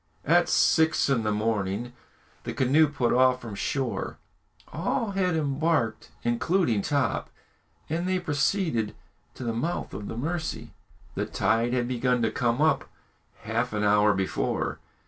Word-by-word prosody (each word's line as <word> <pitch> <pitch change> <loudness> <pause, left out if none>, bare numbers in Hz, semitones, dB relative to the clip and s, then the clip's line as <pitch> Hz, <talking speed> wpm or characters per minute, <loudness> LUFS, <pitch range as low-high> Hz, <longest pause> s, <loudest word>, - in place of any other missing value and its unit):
At - - +4
six 160 -2 +3
in 125 -4 +2
the 105 -1 0
morning 105 +1 -1 0.5
the - - -4
canoe 140 +5 +4
put 135 -5 0
off 130 0 +4
from 115 - -7
the - - -6
shore; 130 +4 -2 0.6
all 200 - -1
had 185 -3 +1
embarked, 145 -6 0
including 120 - +1
Top, 140 0 0 0.6
and 170 +4 -2
they 185 - +2
proceeded 150 - 0 0.4
to - - -7
the 115 -1 -1
mouth 160 +10 -3
of 105 - -6
the - - -6
Mercy. 160 +5 -3 0.4
The - - -2
tide 115 +2 +1
had 120 -1 0
begun 125 -1 +1
to 110 - +1
come 120 +3 +1
up 155 - +2 0.5
half - - -2
an 105 0 -1
hour 105 0 +4
before. 95 0 -1
125 Hz, 145 wpm, -27 LUFS, 115-160 Hz, 0.6 s, At